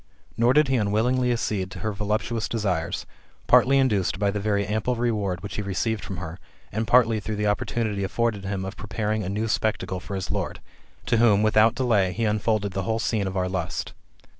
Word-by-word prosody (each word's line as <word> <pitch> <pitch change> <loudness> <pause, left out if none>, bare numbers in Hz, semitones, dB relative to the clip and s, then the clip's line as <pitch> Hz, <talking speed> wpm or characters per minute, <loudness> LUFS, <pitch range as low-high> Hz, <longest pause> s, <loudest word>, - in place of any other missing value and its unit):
Nor 120 +2 +3
did 150 +1 +5
he 130 -1 +2
unwillingly 120 +4 +1
accede 105 -5 -1
to - - -9
her 110 - -1
voluptuous 105 +3 -2
desires, 95 -8 -1 0.4
partly 135 +2 +5
induced 105 -9 +2
by 100 0 +1
the 105 - -2
very 100 0 0
ample 110 +4 -1
reward 105 -7 -1
which 100 - -6
he - - 0
received 105 +3 -2
from 95 - -6
her, 80 0 -6 0.3
and 110 +2 -2
partly 115 -3 +4
through 105 +1 -4
the 105 0 -1
opportunity 105 0 -1
afforded 105 0 -1
him 95 -1 -3
of 95 +2 -6
preparing 110 +1 -2
a 90 - -3
new 105 +3 -1
spectacle 105 -4 -1
for 100 +2 -6
his 95 - -3
lord; - - -3 0.5
to 115 - +2
whom, 110 -3 +4
without 110 +2 +4
delay, 105 -8 +2
he 115 +3 -1
unfolded 105 -1 0
the 95 - -1
whole 110 +4 -1
scene 110 -3 0
of 95 0 -3
our 90 0 +1
lust. 90 -2 -3
105 Hz, 200 wpm, -25 LUFS, 100-115 Hz, 0.5 s, did